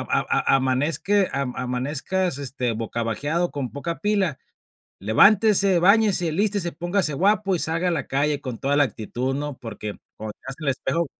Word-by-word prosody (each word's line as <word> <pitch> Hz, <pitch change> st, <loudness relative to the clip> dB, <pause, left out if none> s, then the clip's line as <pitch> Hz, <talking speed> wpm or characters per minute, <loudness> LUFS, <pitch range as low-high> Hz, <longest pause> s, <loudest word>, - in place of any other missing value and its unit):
a -, -, 0 dB
a -, -, +1 dB
a -, -, +7 dB
amanezque 145 Hz, +9 st, +1 dB
am 135 Hz, -2 st, -2 dB
amanezcas 140 Hz, +7 st, -2 dB
este 130 Hz, -3 st, -2 dB
bocabajeado 115 Hz, +9 st, -2 dB
con 135 Hz, -4 st, -4 dB
poca 165 Hz, +4 st, -5 dB
pila. 200 Hz, -8 st, 0 dB, 0.6 s
Levántese, 195 Hz, -, +4 dB
báñese, 195 Hz, -2 st, +3 dB
alístese, 195 Hz, 0 st, 0 dB
póngase 175 Hz, -3 st, -1 dB
guapo 195 Hz, +4 st, +2 dB
y -, -, 0 dB
salga 165 Hz, +3 st, -1 dB
a -, -, +2 dB
la 150 Hz, -6 st, -2 dB
calle 145 Hz, +1 st, 0 dB
con 125 Hz, -5 st, -6 dB
toda 140 Hz, +1 st, 0 dB
la 145 Hz, -, +5 dB
actitud", 125 Hz, +2 st, -3 dB
¿no?, 145 Hz, 0 st, -4 dB
porque 105 Hz, -3 st, -7 dB, 0.2 s
cuando 110 Hz, 0 st, -6 dB
te -, -, -50 dB
veas 135 Hz, 0 st, -6 dB
al 155 Hz, -, -2 dB
espejo 165 Hz, +5 st, -1 dB
145 Hz, 170 wpm, -23 LUFS, 130-185 Hz, 0.6 s, a